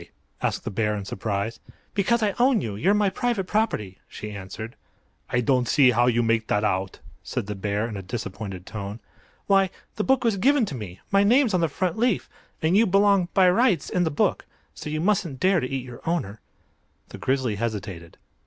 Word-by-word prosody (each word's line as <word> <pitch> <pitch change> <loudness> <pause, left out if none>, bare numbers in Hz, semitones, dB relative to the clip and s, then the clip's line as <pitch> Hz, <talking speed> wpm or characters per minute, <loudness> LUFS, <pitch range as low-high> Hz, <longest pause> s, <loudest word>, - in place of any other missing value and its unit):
asked - - -1
the 115 - -4
bear, 105 +1 0
in 100 -1 -5
surprise. 100 +3 -3 0.3
"Because 225 +4 +1
I 205 -2 +1
own 250 -1 +4
you. 110 - -4
You're 185 - +2
my 205 -2 +2
private 235 -1 -1
property," 145 - -1
she 105 - -7
answered. 100 +3 -7 0.5
"I 120 - +1
don't 125 -1 +2
see 130 -1 +5
how 120 +1 +3
you 120 -1 +3
make 115 -1 +1
that 105 - +1
out," 95 -2 -1 0.2
said - - -4
the 105 - -4
bear, 105 +2 -2
in 110 - -6
a 100 - -5
disappointed 95 -2 -6
tone. 100 +1 -6 0.5
"Why, 195 -1 +4 0.3
the 210 - 0
book 265 +1 +2
was 225 -4 +2
given 270 +5 +3
to 170 - -6
me; 105 -8 -7
my 200 0 +5
name's 240 +2 +4
on 180 - +2
the 165 - +3
front 185 +6 -2
leaf. 240 -4 +1 0.4
And 160 +4 +3
you 220 +2 +5
belong, 195 -1 +4
by 190 -1 +6
rights, 195 - +2
in 180 - +2
the 160 - +1
book. 145 - 0 0.3
So - - -7
you 155 +1 -2
mustn't 180 -8 0
dare 185 +2 +3
to 125 - -3
eat 135 -2 -3
your 125 -1 -10
owner!" 110 - -2 0.7
The - - -10
Grizzly 130 -5 0
hesitated. 100 -7 -5
130 Hz, 200 wpm, -25 LUFS, -, 0.7 s, by